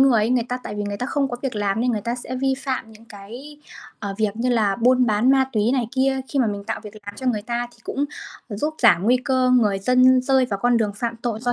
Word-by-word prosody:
người 260 -5 +5
ấy, 225 - 0
người 245 -2 +2
ta 250 +1 -2
tại 210 - -5
vì 205 - -2
người 205 0 -4
ta 250 - -3
không 280 -1 0
có 245 - -3
việc 265 -3 -3
làm 205 +1 0
nên 250 - +1
người 215 - -1
ta 235 +4 -2
sẽ 255 +1 -6
vi 270 0 +2
phạm 255 -5 -4
những 220 +1 -17
cái, 230 +8 -11 0.4
ờ, 200 -2 -4
việc 215 -1 0
như 245 +2 -1
là 215 -5 +2
buôn 250 +1 +3
bán 220 +4 +3
ma 265 -1 +4
túy 220 +2 +1
này 245 -4 0
kia, 265 0 +1
khi 280 - -2
mà 245 - +3
mình 200 -1 -4
tạo - - -4
việc 210 0 -10
làm 205 - -6
cho 260 - -6
người 215 -4 0
ta 240 +1 -3
thì - - -22
cũng 280 - -2 0.5
giúp 295 +10 -2
giảm 190 -7 +5
nguy 245 +4 +4
cơ 255 -1 +2
người 215 -6 +3
dân 255 +4 +4
rơi 265 0 +3
vào 200 -4 -3
con 245 -1 +3
đường 210 -3 0
phạm 230 +1 -3
tội 230 -2 -4
do 245 0 0
240 Hz, 280 wpm, -22 LUFS, 210-255 Hz, 0.5 s, người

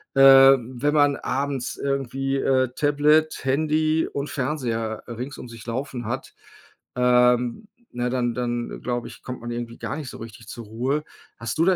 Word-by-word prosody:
äh, - - +2
wenn 135 0 +6
man 145 -2 +4
abends 135 -1 -2
irgendwie, 135 0 -1
äh, 130 -1 +2
Tablet, 150 +1 +2
Handy 155 +3 +1
und 140 +1 -3
Fernseher 120 -5 -2
rings 125 +4 -6
um - - -8
sich 115 -2 -11
laufen 125 0 -4
hat. 130 +4 -4 0.6
Ähm, 125 - +3 0.2
ne, 120 0 -2
dann 120 -1 0
dann 120 0 -3
glaube 120 -1 -3
ich, - - -12
kommt 125 -2 -6
man 120 0 -5
irgendwie 120 0 -5
gar - - -4
nicht 150 -4 -6
so - - -9
richtig 115 0 -11
zur 120 0 -8
Ruhe. 130 +8 -1 0.3
Hast 115 - -4
du 165 - +4
da 190 0 +4
130 Hz, 170 wpm, -24 LUFS, 120-140 Hz, 0.6 s, wenn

